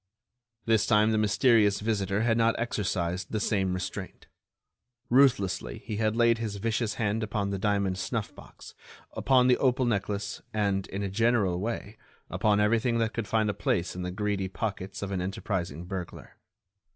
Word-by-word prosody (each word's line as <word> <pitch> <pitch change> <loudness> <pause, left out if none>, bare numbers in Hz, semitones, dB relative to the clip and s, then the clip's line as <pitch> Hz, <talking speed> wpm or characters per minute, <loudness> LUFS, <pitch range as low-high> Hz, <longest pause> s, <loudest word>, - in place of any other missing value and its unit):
This 110 -2 +2
time 110 -1 +4
the 110 - +2
mysterious 105 -1 +3
visitor 105 -2 -1
had 115 0 +2
not 115 0 +3
exercised 95 -6 -2
the 110 - -1
same 95 -3 0
restraint. 90 - -6 0.9
Ruthlessly, 110 -9 +3
he 105 - -4
had 110 0 +1
laid 115 -1 +3
his 110 -3 -3
vicious 110 +1 -1
hand 110 0 -1
upon 105 -2 -2
the 100 - -2
diamond 100 -2 0
snuff 105 +3 -3
box, - - -13 0.4
upon 130 -2 +3
the 125 -1 +4
opal 130 -1 +2
necklace, 100 -2 -2
and, 100 -2 0
in 100 +1 -4
a 100 - -2
general 105 -4 +2
way, 110 0 -4 0.3
upon 105 -1 +2
everything 115 +3 +2
that 115 -1 0
could 115 -3 -3
find 110 -1 +1
a 105 - 0
place 90 -4 -1
in 90 - -5
the 90 - -3
greedy 100 0 -2
pockets 95 0 -4
of 100 - -4
an 95 -2 -1
enterprising 90 -4 -3
burglar. 95 -2 -7
105 Hz, 165 wpm, -28 LUFS, 95-115 Hz, 0.9 s, time